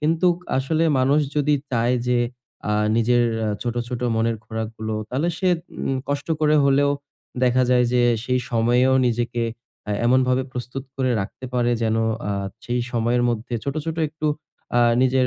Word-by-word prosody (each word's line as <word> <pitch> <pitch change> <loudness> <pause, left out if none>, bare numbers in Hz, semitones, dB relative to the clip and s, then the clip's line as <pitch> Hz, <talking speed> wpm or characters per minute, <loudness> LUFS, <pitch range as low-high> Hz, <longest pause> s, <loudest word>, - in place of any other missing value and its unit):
কিন্তুক 165 +3 +2 0.2
আসলে 155 +5 +1
মানুষ 140 +4 +3 0.2
যদি 145 0 +3 0.2
চায় 120 +1 +2
যে 125 -1 +2 0.5
আ - - +2 0.2
নিজের 120 +1 +3 0.2
আ - - 0
ছোট, 120 -1 -2
ছোট 125 -1 -4
মনের 115 0 +1
খোরাকগুলো 110 0 -4
তাহলে 140 +9 0
সে 185 - +1 0.4
উম 135 - 0
কষ্ট 145 +2 -2
করে 155 0 +4
হলেও 140 +1 +4 0.5
দেখা 125 +1 +3
যায় 125 -1 +4
যে 125 - +3 0.2
সেই 125 -1 +1
সময়েও 120 +3 +3
নিজেকে 120 0 -1 0.5
আ - - -1 0.2
এমনভাবে 130 +1 +3
প্রস্তুত 125 +2 -5
করে 130 -2 +1
রাখতে 100 +6 -7
পারে 120 -1 +2
যেন 110 0 +1 0.3
আ - - 0 0.3
সেই 120 0 -1
সময়ের 120 +1 +1
মধ্যে 120 +1 -2
ছোট, 140 +1 -2
ছোট 160 - -2
একটু 155 +1 -4 0.5
আ - - +5 0.2
নিজের 130 0 +3
125 Hz, 160 wpm, -22 LUFS, 120-140 Hz, 0.5 s, আ